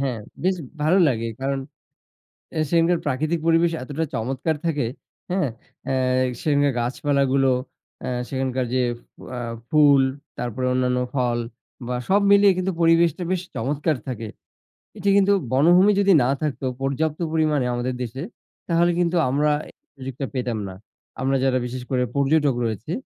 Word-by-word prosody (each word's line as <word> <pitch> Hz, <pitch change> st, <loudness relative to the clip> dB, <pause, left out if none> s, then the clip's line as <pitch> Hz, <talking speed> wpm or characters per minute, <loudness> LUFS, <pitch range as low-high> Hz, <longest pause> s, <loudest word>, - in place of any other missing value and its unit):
হ্যাঁ, 130 Hz, -4 st, -1 dB, 0.2 s
বেশ 185 Hz, 0 st, +2 dB, 0.3 s
ভালো 170 Hz, +6 st, +4 dB
লাগে। 115 Hz, -3 st, -1 dB
কারণ 135 Hz, 0 st, -1 dB, 1.0 s
এ -, -, +1 dB
সেখানকার 170 Hz, +1 st, +3 dB
প্রাকৃতিক 155 Hz, +4 st, 0 dB
পরিবেশ 165 Hz, +1 st, +4 dB
এতটা 150 Hz, +4 st, -3 dB
চমৎকার 135 Hz, +7 st, -1 dB
থাকে, 150 Hz, -8 st, 0 dB, 0.4 s
হ্যাঁ? 185 Hz, -7 st, +1 dB, 0.4 s
আ -, -, +1 dB, 0.5 s
সেখানকার 145 Hz, -3 st, +2 dB
গাছপালাগুলো, 135 Hz, +1 st, +1 dB, 0.5 s
অ্যা -, -, -4 dB, 0.2 s
সেখানকার 130 Hz, -1 st, -1 dB
যে, 130 Hz, -, +2 dB, 0.5 s
অ্যা 125 Hz, -, -4 dB, 0.3 s
ফুল 145 Hz, -3 st, +6 dB, 0.4 s
তারপরে 125 Hz, +1 st, -3 dB
অন্যান্য 125 Hz, 0 st, +1 dB, 0.2 s
ফল 120 Hz, -2 st, +1 dB, 0.5 s
বা 125 Hz, -, -2 dB
সব 200 Hz, +2 st, +4 dB
মিলিয়ে 200 Hz, -1 st, +7 dB
কিন্তু 185 Hz, +1 st, 0 dB
পরিবেশটা 165 Hz, +1 st, +3 dB
বেশ 185 Hz, -2 st, 0 dB
চমৎকার 145 Hz, +5 st, 0 dB
থাকে। 115 Hz, -3 st, -4 dB, 0.7 s
এটি 200 Hz, -1 st, -2 dB
কিন্তু 200 Hz, 0 st, +4 dB, 0.2 s
বনভূমি 175 Hz, +9 st, +5 dB
যদি 200 Hz, 0 st, +4 dB
না 120 Hz, -, +2 dB
থাকতো 140 Hz, -3 st, -2 dB
পর্যাপ্ত 145 Hz, +3 st, -1 dB
পরিমাণে 155 Hz, -5 st, +1 dB
আমাদের 125 Hz, +1 st, -2 dB
দেশে, 125 Hz, +4 st, -5 dB, 0.5 s
তাহলে 170 Hz, 0 st, +3 dB
কিন্তু 175 Hz, 0 st, +1 dB
আমরা 150 Hz, +3 st, +2 dB, 0.2 s
এ -, -, -12 dB, 0.2 s
সুযোগটা 135 Hz, 0 st, -5 dB
পেতাম 125 Hz, -3 st, -2 dB
না। 95 Hz, -, -8 dB, 0.5 s
আমরা 135 Hz, +1 st, +1 dB
যারা 130 Hz, -1 st, +2 dB
বিশেষ 125 Hz, +1 st, -5 dB
করে 130 Hz, -2 st, +1 dB
পর্যটক 140 Hz, -1 st, +2 dB
রয়েছি। 115 Hz, +6 st, -3 dB
140 Hz, 145 wpm, -23 LUFS, 130-165 Hz, 1.0 s, মিলিয়ে